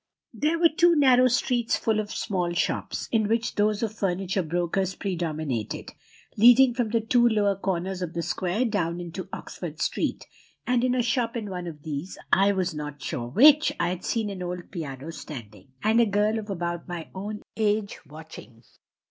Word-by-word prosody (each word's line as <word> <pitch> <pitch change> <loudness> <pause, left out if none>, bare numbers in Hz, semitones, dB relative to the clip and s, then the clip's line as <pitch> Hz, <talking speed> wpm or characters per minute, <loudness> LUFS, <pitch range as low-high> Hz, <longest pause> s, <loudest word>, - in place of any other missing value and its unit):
"There 310 +3 0
were 335 0 +5
two 345 -1 +5
narrow 255 -4 +5
streets 245 -1 +1
full 220 -1 0
of 210 -1 -3
small 180 -4 -2
shops, 175 - -2
in 220 -3 +2
which 225 +1 0
those 210 +1 +1
of 220 - -2
furniture 190 -1 -1
brokers 175 +3 -1
predominated, 155 - -3 0.4
leading 245 +3 +7
from 240 -2 -1
the 230 +1 +1
two 240 +2 +3
lower 205 -3 +2
corners 185 -1 -2
of 175 -2 -4
the 170 - -2
square 190 +10 -1
down 175 -6 -1
into 175 +2 -7
Oxford - - -7
Street; - - -1 0.4
and 250 -1 +1
in 255 0 +2
a 250 - +2
shop 235 0 0
in 210 -3 -5
one 180 -1 -5
of 150 -3 -9
these, 155 +3 -5 0.2
I 195 +1 +5
was 185 -3 -1
not 150 -1 -6
sure 120 -4 -4
which, 295 - +6
I 175 - +1
had 180 0 -4
seen 220 -3 -1
an 190 -2 -7
old 180 0 -5
piano 150 -3 -6
standing, 110 - -10 0.2
and 220 +2 +4
a 230 - +3
girl 210 +2 +1
of 215 -1 -8
about 175 -2 -3
my 175 -3 -6
own 205 +2 -6
age 210 -1 0
watching. 150 -6 -12
195 Hz, 180 wpm, -26 LUFS, 170-225 Hz, 0.4 s, leading